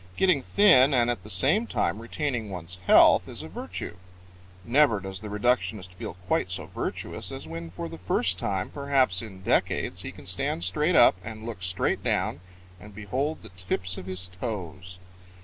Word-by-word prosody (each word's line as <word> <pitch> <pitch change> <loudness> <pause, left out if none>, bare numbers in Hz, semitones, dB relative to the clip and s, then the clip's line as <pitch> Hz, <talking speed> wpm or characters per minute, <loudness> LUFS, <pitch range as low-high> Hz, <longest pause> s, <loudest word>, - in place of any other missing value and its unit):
Getting 180 -7 +3
thin 135 -6 +5
and 120 -1 +3
at 120 - -4
the 105 - -12
same 175 - +2
time 100 +6 -1
retaining 120 -2 -3
one's 90 -1 -6
health - - +7
is - - -7
a - - -7
virtue. 85 - -7 0.7
Never 125 -3 +4
does 95 0 -6
the 105 - -8
reductionist 105 -3 0
feel 90 - -7
quite 90 - 0
so 90 - -4
virtuous - - -4
as 80 - -7
when 85 +1 -6
for 85 0 -6
the 80 0 -9
first 90 0 +1
time, 95 -1 -2
perhaps 135 -9 +1
in 95 -4 -10
decades, - - 0
he - - -5
can - - -14
stand 85 - -1
straight 150 - +2
up 120 - +7
and 110 +1 -8
look 115 -5 -6
straight 90 0 0
down - - 0 0.4
and 105 +2 -13
behold 130 +10 -3
the 110 - -6
tips 90 0 -2
of 90 - -9
his 95 0 -2
toes. 90 -2 -6
100 Hz, 180 wpm, -27 LUFS, 90-125 Hz, 0.7 s, health